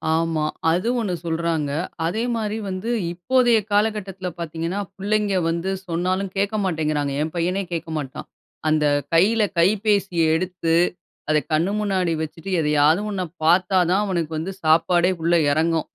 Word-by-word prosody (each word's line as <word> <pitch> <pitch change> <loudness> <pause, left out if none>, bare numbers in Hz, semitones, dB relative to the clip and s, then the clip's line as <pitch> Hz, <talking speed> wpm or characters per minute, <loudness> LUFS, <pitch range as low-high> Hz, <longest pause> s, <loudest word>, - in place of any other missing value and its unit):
ஆமா. 165 -1 0 0.3
அது 180 +7 0
ஒண்ணு 200 -5 -2
சொல்றாங்க. 165 -2 -1 0.4
அதேமாரி 220 +3 -1
வந்து 185 +4 -4 0.2
இப்போதைய 240 +6 +3
காலகட்டத்துல 205 -3 0
பார்த்தீங்கன்னா, 165 +3 -3 0.2
புள்ளைங்க 205 0 0
வந்து 170 +3 -2 0.2
சொன்னாலும் 185 +3 -1
கேட்க 200 +2 0
மாட்டேங்கிறாங்க. 155 -5 -1
என் 155 +1 -2
பையனே 180 +4 0
கேட்க 165 -1 -4
மாட்டான். 140 -1 -6 0.4
அந்த 155 -1 +2 0.3
கையில 205 +7 +4 0.2
கைபேசிய 195 -1 +2
எடுத்து, 175 -1 -1 0.5
அத 155 - +4 0.2
கண்ணு 165 +5 +2
முன்னாடி 190 -4 0
வச்சுட்டு 160 +3 -6
எதையாவது 150 +3 +3
ஒன்ன 190 -2 -2 0.2
பார்த்தா 185 +3 +4
தான் 195 +3 +3
அவனுக்கு 170 -5 -2
வந்து 165 +5 -3
சாப்பாடே 170 +3 +3
உள்ள 170 +1 +2 0.2
இறங்கும். 160 +1 +1
175 Hz, 130 wpm, -22 LUFS, 160-195 Hz, 0.5 s, கையில